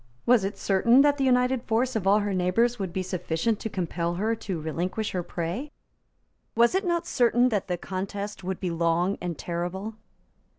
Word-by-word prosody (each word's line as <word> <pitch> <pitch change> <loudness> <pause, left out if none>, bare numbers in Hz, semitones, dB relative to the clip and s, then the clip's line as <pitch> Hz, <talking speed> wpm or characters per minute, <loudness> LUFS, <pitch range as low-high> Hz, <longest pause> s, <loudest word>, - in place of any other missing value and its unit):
Was 240 -4 +5
it 195 +1 -3
certain 235 +7 +4
that 290 0 +3
the - - +2
united 250 -1 +3
force 245 +2 0
of 200 -4 -1
all 205 +2 +5
her 205 -1 -1
neighbours 210 +7 +1
would 190 -3 -3
be 185 +2 -2
sufficient 185 +4 -1
to 220 - -4
compel 170 -2 -2
her 215 +5 0
to 190 -6 -4
relinquish 175 +7 -3
her 180 - -1
prey? 175 - -4 0.9
Was 235 +5 +4
it 380 +1 0
not 340 -1 0
certain 245 -4 +3
that 210 -5 -1
the 180 -1 -1
contest 195 +3 -5
would 185 0 -3
be 180 -2 -2
long 170 +3 +1
and 175 -3 -4
terrible? 180 +5 -4
195 Hz, 185 wpm, -26 LUFS, 180-235 Hz, 0.9 s, Was